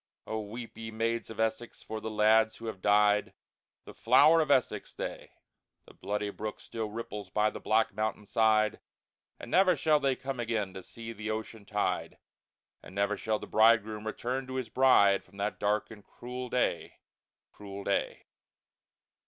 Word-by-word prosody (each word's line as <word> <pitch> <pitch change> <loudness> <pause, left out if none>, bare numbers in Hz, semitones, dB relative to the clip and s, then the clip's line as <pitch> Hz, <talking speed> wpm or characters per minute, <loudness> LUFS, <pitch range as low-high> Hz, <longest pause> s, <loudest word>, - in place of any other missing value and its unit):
Oh, 110 - -3
weep, 115 +3 -8
ye 115 0 -5
Maids 115 +1 -2
of 110 - -9
Essex, 110 +1 -2
for 110 0 -6
the 110 - -4
Lads 110 +1 +3
who 115 - -10
have 110 -4 -6
died, 105 0 +3 0.5
The - - -10
Flower 165 +1 +5
of 155 - -1
Essex 125 -7 +1
they! - - -6 0.5
The - - -16
Bloody 105 0 -3
Brook 110 +1 -6
still 110 -2 -5
ripples 105 -3 -6
by 105 +2 +1
the - - -7
black 110 -1 +1
Mountain 110 0 -2
side, 110 -1 +2 0.6
But - - -10
never 185 +5 +4
shall 155 -2 +3
they 135 -2 +1
come 135 -1 -5
again 110 -5 -2
to 95 - -7
see 115 +4 -9
the 110 0 -6
ocean 110 -1 -5
tide, 105 -1 -2 0.6
And 95 - -13
never 100 +1 +1
shall 110 +1 -1
the - - -8
Bridegroom 110 -1 +3
return 125 +4 -3
to 130 - -6
his 130 -4 -3
Bride, 110 -6 +5
From 100 - -20
that 100 +1 -2
dark 105 +2 0
and 105 -2 -12
cruel 125 +1 -7
Day, 125 - -1 0.6
cruel 100 -1 -9
Day! 100 - -1
110 Hz, 170 wpm, -30 LUFS, 105-115 Hz, 0.6 s, Flower